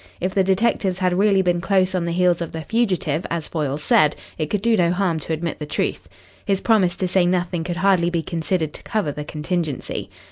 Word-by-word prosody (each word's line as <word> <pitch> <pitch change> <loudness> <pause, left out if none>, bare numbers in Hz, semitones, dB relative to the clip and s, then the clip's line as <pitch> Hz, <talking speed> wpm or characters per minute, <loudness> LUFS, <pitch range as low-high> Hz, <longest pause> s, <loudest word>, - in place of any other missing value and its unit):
If 185 +1 -2
the 195 - +3
detectives 190 -1 +1
had 185 -1 +1
really 200 -2 +4
been 175 -1 +1
close 190 -1 +2
on 180 -2 0
the 170 - -2
heels 175 0 +2
of 170 - -4
the 160 - -4
fugitive, 185 -9 0
as 165 -2 -3
Foyle 145 -4 -2
said, 150 0 +3 0.2
it 155 -2 -3
could 210 -2 -1
do 230 -1 +4
no 175 -4 +3
harm 180 -2 0
to 155 - -7
admit 165 +1 -3
the 150 - -5
truth. - - -2 0.3
His 195 -1 0
promise 195 -6 +2
to 185 - -1
say 185 0 +3
nothing 175 -1 0
could 175 +1 -4
hardly 185 -2 +3
be 170 -2 -1
considered 165 -1 -2
to - - -9
cover 210 -10 -1
the 150 +1 -6
contingency. 155 -1 -3
175 Hz, 220 wpm, -22 LUFS, 160-190 Hz, 0.3 s, really